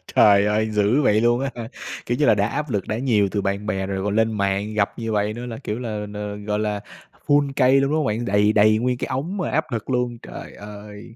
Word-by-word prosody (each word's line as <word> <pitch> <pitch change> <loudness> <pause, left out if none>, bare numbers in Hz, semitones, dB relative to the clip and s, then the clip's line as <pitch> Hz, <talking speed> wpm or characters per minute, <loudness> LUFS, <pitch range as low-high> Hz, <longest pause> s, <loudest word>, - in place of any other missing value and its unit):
Trời 100 -1 +6
ơi, 110 +1 +1
dữ 105 +7 +2
vậy 110 -4 +3
luôn 120 +1 +3
á 135 0 -1
hả? 115 -2 -6 0.4
Kiểu 120 +1 -1
như 150 - +2
là, 110 - +5
đã 100 +1 +1
áp 150 +3 -3
lực 100 -4 -2
đã 110 - -2
nhiều 110 -6 +2
từ 100 - -1
bạn 100 +1 -2
bè 95 -3 -1
rồi 95 -1 -3
còn 105 0 -1
lên 110 0 +2
mạng 100 +1 -1
gặp 105 +2 -1
như 115 -1 -3
vậy 105 0 0
nữa 120 +2 -6
là, 115 -2 -6
kiểu 105 +3 -4
là, 105 -4 -4
n 105 0 -6
gọi 105 0 -1
là, 105 -1 -2 0.5
full 145 -1 +3
cây 130 0 +5
luôn, 140 +1 0
đúng 155 - +2
không 150 - 0
bạn? 110 +3 -1
Đầy 105 +2 +3
đầy 110 +1 +5
nguyên 125 +1 0
cái - - -3
ống 160 +10 -3
mà 180 - -2
áp 160 +1 +1
lực 115 +2 -4
luôn, 125 -2 -1
trời - - -9
ơi! 105 +2 -11
110 Hz, 265 wpm, -22 LUFS, 105-125 Hz, 0.5 s, Trời